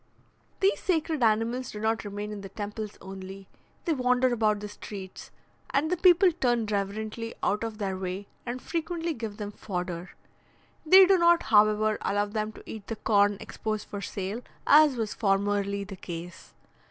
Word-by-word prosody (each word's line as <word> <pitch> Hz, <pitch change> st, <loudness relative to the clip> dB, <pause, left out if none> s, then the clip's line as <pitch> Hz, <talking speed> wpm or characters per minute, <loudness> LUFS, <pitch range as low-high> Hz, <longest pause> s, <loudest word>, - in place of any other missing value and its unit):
These 390 Hz, +1 st, +3 dB
sacred 320 Hz, -4 st, 0 dB
animals 230 Hz, +3 st, +1 dB
do 210 Hz, -, -7 dB
not 220 Hz, -1 st, 0 dB
remain 205 Hz, +1 st, -5 dB
in 210 Hz, -1 st, -6 dB
the 195 Hz, -, -8 dB
temples 210 Hz, +1 st, -6 dB
only 195 Hz, 0 st, -9 dB, 0.4 s
they 335 Hz, -, +2 dB
wander 250 Hz, -1 st, +2 dB
about 215 Hz, -3 st, +2 dB
the 210 Hz, -, -6 dB
streets; 200 Hz, -2 st, -9 dB, 0.4 s
and 295 Hz, +4 st, +1 dB
the -, -, +3 dB
people 360 Hz, +1 st, +6 dB
turn 240 Hz, -8 st, +1 dB
reverently 215 Hz, +3 st, -3 dB
out 210 Hz, +2 st, +1 dB
of 225 Hz, -2 st, -4 dB
their 195 Hz, -3 st, -2 dB
way, 185 Hz, +1 st, -4 dB, 0.2 s
and 250 Hz, +1 st, -5 dB
frequently 335 Hz, 0 st, -2 dB
give 225 Hz, -6 st, -6 dB
them 205 Hz, -1 st, -5 dB
fodder. 180 Hz, -3 st, -5 dB, 0.7 s
They 375 Hz, +4 st, +8 dB
do 380 Hz, 0 st, +4 dB
not, 340 Hz, 0 st, +5 dB
however, 215 Hz, 0 st, +4 dB
allow 205 Hz, +1 st, +1 dB
them 215 Hz, +1 st, -3 dB
to -, -, -13 dB
eat 215 Hz, -2 st, -8 dB
the 225 Hz, -, -3 dB
corn 205 Hz, -2 st, +3 dB
exposed 215 Hz, -2 st, -4 dB
for 205 Hz, -, -5 dB
sale, 200 Hz, +4 st, -4 dB, 0.2 s
as 295 Hz, -3 st, +6 dB
was 220 Hz, -2 st, -2 dB
formerly 200 Hz, -1 st, 0 dB
the 195 Hz, -1 st, -9 dB
case. 175 Hz, 0 st, -8 dB
215 Hz, 165 wpm, -28 LUFS, 200-250 Hz, 0.7 s, They